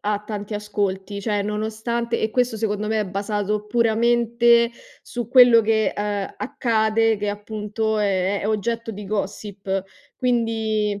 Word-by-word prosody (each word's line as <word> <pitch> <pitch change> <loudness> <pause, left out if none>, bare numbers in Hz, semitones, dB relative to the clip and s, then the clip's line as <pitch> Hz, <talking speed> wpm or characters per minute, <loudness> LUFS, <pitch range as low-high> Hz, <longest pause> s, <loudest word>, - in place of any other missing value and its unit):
ha 210 0 0
tanti 205 0 -5
ascolti; 200 -1 -3
cioè 205 -1 0
nonostante 220 +3 -2
e 220 - 0
questo 245 -3 +1
secondo 210 -1 -2
me 220 0 +1
è 210 - -2
basato 205 +2 -2
puramente 235 +1 +3 0.3
su 240 -3 -6
quello 245 -2 +8
che, 220 0 +1
ehm, 205 -1 -2
accade, 225 -4 +1
ed 210 -1 -4
è 210 - 0
appunto 210 +1 -2
è 195 -1 +1
è 205 - -2
oggetto 230 +2 -1
di 205 -1 -8
gossip; 195 -1 -3 0.3
quindi 220 -4 0
215 Hz, 140 wpm, -22 LUFS, 205-230 Hz, 0.3 s, quello